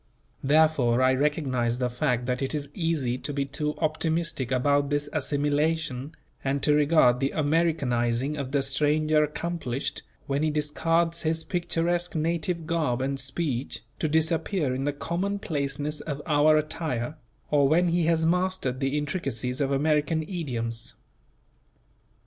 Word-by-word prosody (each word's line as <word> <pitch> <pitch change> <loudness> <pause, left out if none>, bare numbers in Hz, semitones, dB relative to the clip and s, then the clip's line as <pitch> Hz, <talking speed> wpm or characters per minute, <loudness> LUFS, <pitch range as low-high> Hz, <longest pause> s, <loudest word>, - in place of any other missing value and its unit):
Therefore, 140 -4 +4
I 130 0 +5
recognize 130 -4 0
the 125 -1 0
fact 125 0 -1
that 125 +1 -1
it 135 +3 -1
is 145 -2 -4
easy 150 -8 -1
to - - -3
be 140 -1 -1
too 150 +2 -3
optimistic 160 -4 -1
about 140 +2 +2
this 145 0 0
assimilation, 145 -1 -1 0.3
and 135 +1 -1
to 150 - +4
regard 150 -4 +4
the 135 +1 +1
Americanizing 145 -5 +1
of 140 -3 -4
the 140 -1 +1
stranger 150 +3 +2
accomplished, 150 -4 -3 0.2
when 140 0 -1
he 155 - +2
discards 165 +3 0
his 160 0 0
picturesque 175 +1 -1
native 165 +1 -1
garb 155 -7 0
and 135 +1 -1
speech, 135 -3 -2 0.2
to - - +1
disappear 160 -1 +1
in 135 +2 -2
the 145 - +1
commonplaceness 150 -4 -2
of 145 -3 -4
our 155 0 +4
attire; 155 -3 -2 0.4
or 145 -2 +4
when 170 +4 +3
he 170 -1 +2
has 160 -1 +2
mastered 180 -6 0
the 135 +1 0
intricacies 135 -4 -2
of 140 0 +1
American 150 +3 +1
idioms. 120 - -3
150 Hz, 140 wpm, -26 LUFS, 135-160 Hz, 0.4 s, I